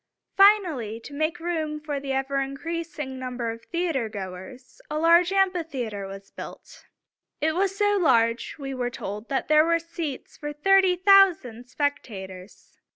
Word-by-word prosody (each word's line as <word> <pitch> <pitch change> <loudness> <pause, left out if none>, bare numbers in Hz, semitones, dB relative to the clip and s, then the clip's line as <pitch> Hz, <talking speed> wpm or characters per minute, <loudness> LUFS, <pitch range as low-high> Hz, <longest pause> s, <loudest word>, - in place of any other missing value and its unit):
Finally, 345 - +4
to 280 - -11
make 310 +4 -1
room 320 -3 -2
for 295 -2 -4
the 275 0 -5
ever 270 +1 -1
increasing 295 0 -5
number 250 -2 -3
of 230 0 -9
theater 330 -10 -1
goers, 195 +5 -9
a 305 0 -2
huge 340 +2 +5
amphitheater 320 - -1
was 195 0 -10
built. - - -11 0.5
It 315 +1 +1
was 390 +3 0
so 410 0 +2
large, 230 -6 +2
we 270 -2 -5
are 250 -2 -2
told, 210 -1 -7
that 270 - -1
there 305 0 +6
were 335 +1 +2
seats 335 -4 -6
for 295 0 -5
thirty 380 +4 +4
thousand 355 - +4
spectators. 200 -10 -5
290 Hz, 150 wpm, -25 LUFS, 240-335 Hz, 0.5 s, there